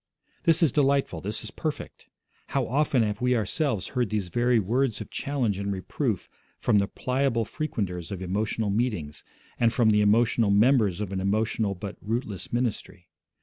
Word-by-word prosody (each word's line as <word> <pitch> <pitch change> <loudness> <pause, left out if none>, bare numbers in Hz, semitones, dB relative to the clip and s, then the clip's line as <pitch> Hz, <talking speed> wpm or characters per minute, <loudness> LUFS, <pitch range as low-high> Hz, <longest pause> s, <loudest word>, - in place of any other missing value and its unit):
This 165 0 +5
is 155 - +4
delightful, 140 - +1
this 105 +3 -4
is 110 - -8
perfect. 150 +3 -5 0.4
How - - 0
often 135 -1 +2
have 105 0 -2
we 125 0 +3
ourselves 115 - -1
heard 125 -5 -1
these 105 -4 -2
very 120 +5 +2
words 115 +4 +1
of - - -8
challenge 125 -9 -1
and 100 0 -2
reproof 95 -2 -2 0.3
from 105 - +3
the 100 - +1
pliable 125 -1 0
frequenters 95 - -4
of 100 - -4
emotional 105 +3 -1
meetings, 100 -10 -2 0.4
and 115 -1 +4
from 110 -1 +3
the 105 0 +4
emotional 110 +1 +3
members 105 -2 +3
of 100 -2 -4
an 95 - -1
emotional 105 +1 0
but 100 +2 -7
rootless 110 -3 -4
ministry. 115 -7 -3
110 Hz, 165 wpm, -26 LUFS, 100-125 Hz, 0.4 s, This